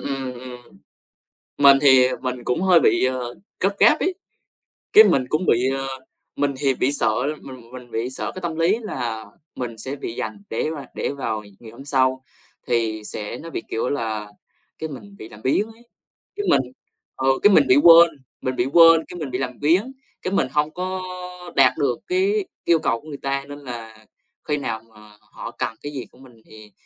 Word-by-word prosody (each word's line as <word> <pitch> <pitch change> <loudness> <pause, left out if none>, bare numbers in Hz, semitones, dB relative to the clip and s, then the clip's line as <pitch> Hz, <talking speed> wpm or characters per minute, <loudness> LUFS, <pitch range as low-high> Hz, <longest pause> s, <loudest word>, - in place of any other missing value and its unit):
ừm, 135 -2 -4
ừm. 125 -4 -12 0.8
Mình 140 -1 +7
thì 130 -3 +6 0.2
mình 125 -2 -4
cũng 125 +8 -1
hơi 185 -3 +5
bị, 175 - +3
ờ, 125 -2 -2 0.3
gấp 195 +2 +1
gáp 310 - +5
ấy, 370 +1 0 0.8
cái 430 +1 +10
mình 130 - +2
cũng 155 +4 0
bị, 125 +2 +3
ờ 135 0 -4 0.5
mình 140 -1 0
thì 135 -1 +1
bị 130 +2 0
sợ 110 -6 +3 0.3
mình 125 -3 -12
mình 125 -2 -11
bị 115 +3 -2
sợ 130 - -3
cái 185 - -7
tâm 170 -2 -3
lý 170 +6 +2
là 120 - -4 0.3
mình 120 -3 -5
sẽ 130 +6 -4
bị 115 - -6
dành 105 -1 -5
để 115 - -1
mà 150 -4 -6
để - - -2
vào 110 -6 -3 0.2
ngày 115 -2 -12
hôm 125 +4 -12
sau, 130 -2 +1 0.4
thì 110 -2 0
sẽ 105 0 -4
nó 165 - -9
bị 160 - -4
kiểu 115 +2 -1
là 110 -6 -3 0.5
cái 160 - -4
mình 105 -8 -10
bị 110 - -10
làm 105 - -14
biếng 200 +11 +1
ấy. 225 +1 -17 0.5
Cái 410 0 -3
mình 135 - +5 0.5
ừ, 130 - -2 0.2
cái 205 - +7
mình 145 -6 +5
bị 130 - +6
quên, 170 0 +9 0.3
mình 130 0 -2
bị 120 - +1
quên, 165 +2 +6
cái 180 - -9
mình 145 -5 -5
bị 125 - -1
làm 125 -2 -4
biếng, 180 - +2 0.3
cái 185 - -3
mình 165 - +2
hông 150 +1 +1
có 185 +1 -3 0.5
đạt 135 -2 +5
được 135 -6 0
cái 385 +2 +1 0.2
yêu 170 -2 +3
cầu 115 -5 -1
của 155 - -17
người 145 -2 -7
ta. 135 0 -2
Nên 145 0 -9
là 115 -5 -9 0.4
khi 150 - +2
nào 115 -6 -4
mà 105 -1 -17
họ - - -9
cần 115 - -4
cái 145 - -5
gì 135 -4 -6
của - - -22
mình 125 -4 -18
thì, 110 -1 -15
130 Hz, 205 wpm, -22 LUFS, 120-160 Hz, 0.8 s, cái